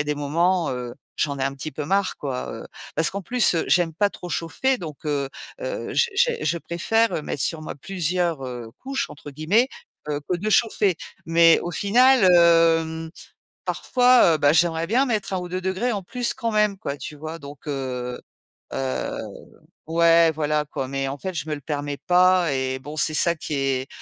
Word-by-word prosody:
a 150 - 0
des 150 0 -1
moments, 165 +4 +1
heu, 125 -1 -5 0.2
j'en 140 -2 0
ai - - -2
un 135 0 -2
petit 145 +2 -6
peu 150 +1 -5
marre 195 +3 0
quoi, 135 -3 -4
heu, - - -8 0.3
parce 160 +1 +3
qu'en 200 0 -5
plus, 240 -3 +4
heu, 165 - 0
j'aime 175 -2 +3
pas 205 +2 +2
trop 180 - -9
chauffer, 250 - 0
donc, 155 -3 -9
heu 140 -2 -1 0.3
heu, - - -4
je 475 - +3
je 485 +4 +3
je 170 - 0
préfère 175 +2 0
mettre 140 - -3
sur 160 -2 0
moi - - -6
plusieurs, 175 -3 -1
heu, 120 -3 -7
«couches» 270 0 -3
entre 145 0 -10
guillemets 175 - +2 0.4
que 150 -1 -3
que 180 - +1
de 210 +5 -3
chauffer. 210 -4 +3 0.3
Mais 165 0 +5
au 175 - -4
final 240 +5 +4
heu, 165 -2 +5
mmh, 160 0 -6 0.5
parfois, 250 -9 +4
heu, - - -1
ben 145 0 +4
j'aimerais 165 0 +2
bien 260 +5 +3
mettre 210 -5 -2
1 185 - 0
ou 180 0 -6
2º 190 +6 -2
en 200 - -3
plus 245 +6 -2
quand 235 -3 -2
même 210 -2 +2
quoi, 140 -5 -4
tu 150 - -7
vois? 155 +2 -7
Donc, 140 -2 -11
heu 125 -3 -4 0.5
heu 65 -2 -3 0.7
ouais, 165 0 +4
voilà 150 0 0
quoi, 135 -2 -5
mais 135 0 -2
en 140 +1 -5
fait 190 +5 -4
je 160 - -3
me 155 - -2
le 145 - -6
permets 145 0 -4
pas 180 -2 +4
et 130 0 -2
bon, 150 +3 -9
c'est 155 0 +2
ça 170 +2 +3
qui 155 - -6
est 135 -1 -1
165 Hz, 200 wpm, -23 LUFS, 145-190 Hz, 0.7 s, Mais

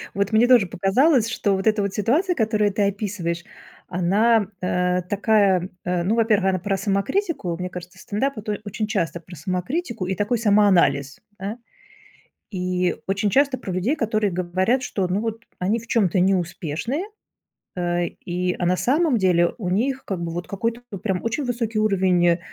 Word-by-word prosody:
Вот 200 +1 0
мне 225 +3 +4
тоже 240 -7 +5
показалось, 230 - +3
что 200 -3 0
вот 190 - -3
эта 215 -1 +3
вот 200 -1 -2
ситуация, 310 - +1
которую 215 -4 +1
ты 205 +1 0
описываешь, 185 -4 -3 0.4
она, 200 +5 +2
э, 180 0 +1
такая, 200 -3 +2 0.2
э, 180 -1 0
ну, 210 +5 +1
во-первых, 215 -4 +3
она 185 -1 0
про 195 +1 -1
самокритику. 200 - -1
Мне 180 +1 -4
кажется, 180 0 -9
стендап- 250 +5 -2
это 210 -1 -3
очень 210 +1 -3
часто 170 -7 -1
про 175 +1 -12
самокритику 185 - -3
и 190 - -1
такой 205 +6 0
самоанализ, 200 - +3 0.2
да. 200 +4 -4 0.9
И 180 -2 -1
очень 195 +1 0
часто 275 +1 +2
про 190 -6 -6
людей, 185 +11 0
которые 215 -5 0
говорят, 185 +8 0
что, 195 -6 -1
ну 185 +3 0
вот, 225 +1 -4
они 200 +6 0
в 230 - -13
чём-то 195 -6 +2
неуспешные, 185 - -1 0.7
э, 175 -1 0 0.2
и, 180 +1 -1
а 175 - 0
на 180 - +2
самом 290 - +2
деле 175 -3 +2
у 185 -7 -3
них 260 +8 0
как 190 -3 -4
бы 165 - -3
вот 175 +1 -4
какой-то 230 +4 -2 0.2
прям 190 -2 -2
очень 240 +6 -2
высокий 230 -3 -2
уровень, 185 -4 +3
200 Hz, 170 wpm, -23 LUFS, 180-225 Hz, 0.9 s, тоже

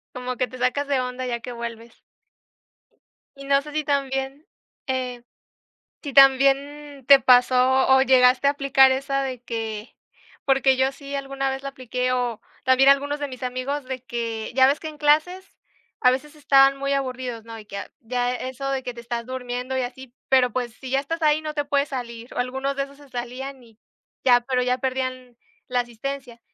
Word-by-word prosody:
Como 250 0 -4
que 255 - 0
te 255 - -10
sacas 255 +3 0
de 275 -2 +1
onda, 250 0 -4
ya 240 -1 -3
que 245 - -7
vuelves. 235 -1 -8 1.3
Y 275 - -10
no 275 0 +3
sé 300 0 -10
si 305 0 -1
también, 275 +1 -2 0.4
eh, 255 -2 -3 0.8
si 285 -3 -6
también 275 +1 +4
te 275 -1 +9
pasó, 255 +1 +4
o 265 - +5
llegaste 260 0 +5
a - - +5
aplicar 275 -2 +4
esa 275 +1 -1
de 255 -3 -5
que 225 -2 -5 0.5
porque 270 -1 +3
yo 265 +1 +2
sí, 280 0 -10
alguna 275 -1 -2
vez 265 0 -4
la 275 - -5
apliqué 255 -1 -2
o 245 -3 -1 0.2
también 260 +1 +5
algunos 285 +1 +2
de 290 - -3
mis 255 -1 -9
amigos, 255 +3 -3
de 255 -1 -6
que 230 -2 -4
ya 260 - +6
ves 285 +3 +1
que 315 - -7
en 305 -1 -9
clases 315 +6 +1 0.4
a 250 - +5
veces 300 +4 -4
estaban 275 -2 +4
muy 275 0 -1
aburridos, 255 -4 -3
¿no? 225 -1 -9
Y 210 - -13
que 200 -1 -8
a 200 - -7
ya 245 0 -1
eso 260 +2 -5
de 265 -1 -2
que 245 - -5
te 235 - -10
estás 235 0 -4
durmiendo 250 0 -4
y 260 - +1
así, 250 0 -7 0.2
pero, 255 -2 +4
pues, 245 -3 -3
si 260 - -9
ya 270 - +3
estás 330 +4 -4
ahí, 305 0 +3
no 305 -1 -5
te 290 - -1
puedes 285 0 0
salir, 235 -2 -7
o - - -10
algunos 265 +3 -2
de 275 - -1
esos 280 0 -12
se 285 -2 -17
salían 255 +2 -6
y 225 -2 -20 0.5
ya, 245 -2 +5
pero 250 0 -1
ya 250 0 +1
perdían 255 -1 -3 0.3
la 250 -1 +1
asistencia. 245 +1 -7
260 Hz, 195 wpm, -23 LUFS, 250-275 Hz, 1.3 s, te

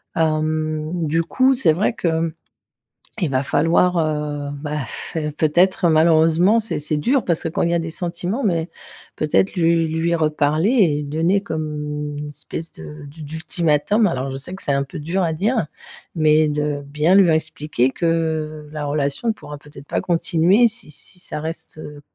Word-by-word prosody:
hem, 155 -1 0 0.2
du 165 +3 +1
coup, 260 +9 +3
c'est 165 -11 +3
vrai 200 +6 0
que, 180 - -3
mmh, 160 0 -1 0.9
il 170 - +2
va 130 0 +1
falloir, 170 +4 +2
heu, 150 -2 -2
bah, 150 0 -3
pff, - - -7 0.2
peut-être, 175 +4 +3
malheureusement, 165 +6 +4
c'est 225 - -3
c'est 150 +1 -1
dur, 255 - +1
parce 170 -3 0
que, 165 - 0
quand 160 - -3
il 170 - +2
y 170 - +1
a - - +2
des 165 - -5
sentiments 175 +8 -3
mais, 170 -4 0 0.5
peut-être, 155 +5 +1
lui 165 -1 +3
lui 165 +2 0
reparler 155 +3 +1
et 175 - +3
donner 165 +7 +1
comme 155 -3 -4 0.4
une 150 - -5
espèce 160 +2 -7
de 75 - -10
d'u 155 +3 -11
d'ultimatum. 160 +6 +1
Alors, 135 -4 -3
je 135 - -4
sais 175 +7 -8
que 190 - -8
c'est 145 - 0
un 140 0 +1
peu 135 - -9
dur 170 +6 -1
à 160 - -1
dire. 215 +2 0 0.5
Mais 155 -1 +4
de 150 -1 -1
bien 150 +5 +2
lui 195 -2 +6
réexpliquer 155 -5 0
que, 160 -1 -1
la 150 -1 -4
relation 145 +10 0
pourra 150 -8 -10
peut-être 145 -1 -14
pas - - -1
continuer 175 +5 +3
si 225 -7 -1
si 180 +4 -3
ça 150 - -5
reste, 160 +1 -6
heu, 150 -1 -9
160 Hz, 180 wpm, -20 LUFS, 150-175 Hz, 0.9 s, lui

